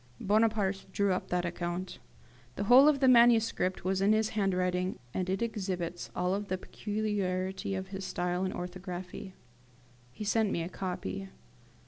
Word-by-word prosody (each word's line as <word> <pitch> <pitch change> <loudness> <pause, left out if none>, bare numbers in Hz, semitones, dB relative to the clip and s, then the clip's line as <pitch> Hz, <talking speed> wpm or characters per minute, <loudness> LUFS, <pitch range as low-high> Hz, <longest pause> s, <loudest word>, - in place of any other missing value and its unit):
Bonaparte 210 -2 +1
drew 200 0 +2
up 180 - -3
that 180 0 0
account. 175 +1 -4 0.6
The 200 - -2
whole 250 +7 +8
of 290 -2 +3
the 265 - +5
manuscript 230 -7 +4
was 190 0 +1
in 200 +2 +4
his 220 0 +2
handwriting, 185 -2 0 0.2
and 185 -1 -2
it 190 +4 0
exhibits 185 -6 -3
all 180 +2 0
the 195 -2 -3
peculiarity 195 -2 -2
of 190 0 -5
his 195 -1 -6
style 180 -1 -1
and 190 - -1
orthography. 180 +1 -7 0.8
He 210 - -7
sent 215 0 +2
me 170 - -1
a 170 - -5
copy. 95 - -5
190 Hz, 150 wpm, -30 LUFS, 180-210 Hz, 0.8 s, whole